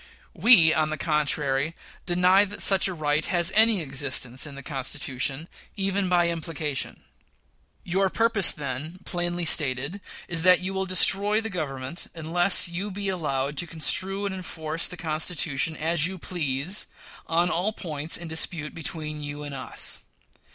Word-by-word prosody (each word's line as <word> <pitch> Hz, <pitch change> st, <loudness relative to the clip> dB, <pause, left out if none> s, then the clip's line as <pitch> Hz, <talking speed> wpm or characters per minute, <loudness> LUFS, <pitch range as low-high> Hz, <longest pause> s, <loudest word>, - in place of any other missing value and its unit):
We, 170 Hz, -10 st, +6 dB
on 155 Hz, -1 st, 0 dB
the 155 Hz, -, -4 dB
contrary, 150 Hz, 0 st, -1 dB, 0.3 s
deny 180 Hz, +2 st, +4 dB
that 205 Hz, +1 st, -10 dB
such 195 Hz, -1 st, +5 dB
a 190 Hz, -, -4 dB
right 150 Hz, -1 st, 0 dB
has 175 Hz, 0 st, +4 dB
any 220 Hz, -2 st, +4 dB
existence 135 Hz, -2 st, 0 dB
in 145 Hz, -, -10 dB
the 140 Hz, -, -10 dB
Constitution, 135 Hz, +1 st, -3 dB, 0.3 s
even 195 Hz, -1 st, -1 dB
by 175 Hz, -1 st, +2 dB
implication. 160 Hz, -4 st, -4 dB, 0.8 s
Your 190 Hz, +2 st, 0 dB
purpose, 225 Hz, -3 st, +4 dB
then, 150 Hz, +5 st, -6 dB
plainly 175 Hz, 0 st, -3 dB
stated, 145 Hz, +4 st, +2 dB, 0.3 s
is 165 Hz, -1 st, +1 dB
that 180 Hz, +1 st, +5 dB
you 185 Hz, +1 st, -4 dB
will 190 Hz, 0 st, -3 dB
destroy 195 Hz, +3 st, +5 dB
the 225 Hz, -1 st, -4 dB
Government 140 Hz, -3 st, -5 dB
unless 175 Hz, +4 st, +3 dB
you 175 Hz, +4 st, -4 dB
be 200 Hz, 0 st, -2 dB
allowed 145 Hz, -6 st, -3 dB
to 175 Hz, -, -3 dB
construe 185 Hz, +6 st, 0 dB
and 200 Hz, -, -3 dB
enforce 165 Hz, -3 st, -4 dB
the 180 Hz, -, -8 dB
Constitution 160 Hz, -2 st, 0 dB
as 165 Hz, 0 st, +1 dB
you 190 Hz, 0 st, -7 dB
please 165 Hz, +1 st, -2 dB, 0.4 s
on 170 Hz, +2 st, +1 dB
all 185 Hz, +5 st, -1 dB
points 155 Hz, -6 st, -2 dB
in 170 Hz, -, -8 dB
dispute 160 Hz, -1 st, -1 dB
between 155 Hz, -1 st, -4 dB
you 145 Hz, 0 st, -7 dB
and 145 Hz, -1 st, -8 dB
us. 135 Hz, -, -4 dB
165 Hz, 150 wpm, -25 LUFS, 150-185 Hz, 0.8 s, We